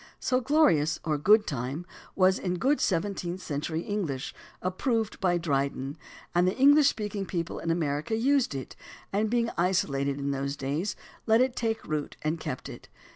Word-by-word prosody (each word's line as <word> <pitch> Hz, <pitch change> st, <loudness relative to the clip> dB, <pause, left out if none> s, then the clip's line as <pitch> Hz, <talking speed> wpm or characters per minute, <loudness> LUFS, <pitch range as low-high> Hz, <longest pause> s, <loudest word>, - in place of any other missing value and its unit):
So 255 Hz, 0 st, +1 dB
"glorious 250 Hz, -, +3 dB
time" 155 Hz, -, -2 dB
or 150 Hz, -, -1 dB
"good 210 Hz, +7 st, +5 dB
time" 135 Hz, +4 st, -3 dB, 0.3 s
was 185 Hz, 0 st, +4 dB
good 195 Hz, +11 st, +1 dB
seven 190 Hz, +2 st, +1 dB
teenth 175 Hz, 0 st, -4 dB
century 160 Hz, 0 st, -3 dB
English, 170 Hz, -11 st, -3 dB, 0.3 s
approved 220 Hz, +4 st, -1 dB
by 175 Hz, -2 st, +2 dB
Dryden, 140 Hz, -3 st, -1 dB, 0.4 s
and 175 Hz, +1 st, +3 dB
the 185 Hz, -, 0 dB
English 285 Hz, +2 st, +6 dB
speaking 210 Hz, -2 st, -4 dB
people 170 Hz, -2 st, -3 dB
in 165 Hz, -, -4 dB
America 155 Hz, +3 st, 0 dB
used 260 Hz, -, +2 dB
it, 135 Hz, -, -6 dB, 0.4 s
and 210 Hz, +2 st, +1 dB
being 235 Hz, 0 st, +1 dB
isolated 140 Hz, -6 st, +1 dB
in 140 Hz, 0 st, -2 dB
those 140 Hz, 0 st, -2 dB
days, 150 Hz, +8 st, -2 dB, 0.3 s
let 220 Hz, +1 st, +5 dB
it 255 Hz, 0 st, +2 dB
take 225 Hz, -1 st, -2 dB
root 150 Hz, -1 st, -3 dB
and 155 Hz, +2 st, -1 dB
kept 130 Hz, -, -5 dB
it. -, -, -11 dB
180 Hz, 170 wpm, -28 LUFS, 145-220 Hz, 0.4 s, English